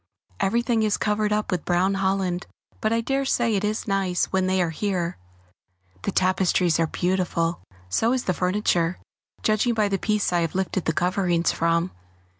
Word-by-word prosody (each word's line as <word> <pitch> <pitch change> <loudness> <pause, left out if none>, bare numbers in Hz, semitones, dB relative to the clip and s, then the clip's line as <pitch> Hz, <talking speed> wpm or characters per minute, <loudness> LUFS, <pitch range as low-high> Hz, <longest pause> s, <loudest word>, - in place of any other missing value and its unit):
Everything 235 +3 +1
is 215 -1 +1
covered 210 0 0
up 210 0 0
with 180 -4 -1
brown 180 +2 +2
holland, 190 -2 -1 0.3
but 215 - +1
I 230 0 +2
dare 270 +4 0
say 240 -4 +1
it 200 0 0
is 215 +2 -2
nice 195 -3 +1
when 190 -1 +2
they 190 0 +1
are 175 -2 +1
here. 175 - -2 0.8
The - - -2
tapestries 185 -2 +2
are 165 - +2
beautiful, 175 -1 -1 0.3
so 225 - +1
is 255 -1 0
the 185 - 0
furniture, 180 -2 +1 0.5
judging 215 +2 +2
by 210 -2 +2
the 195 -1 0
piece 210 -2 0
I 175 - +3
have 165 0 -2
lifted 190 -1 -1
the 160 - +1
coverings 175 -1 +1
from. 170 +2 +1
190 Hz, 175 wpm, -24 LUFS, 175-210 Hz, 0.8 s, I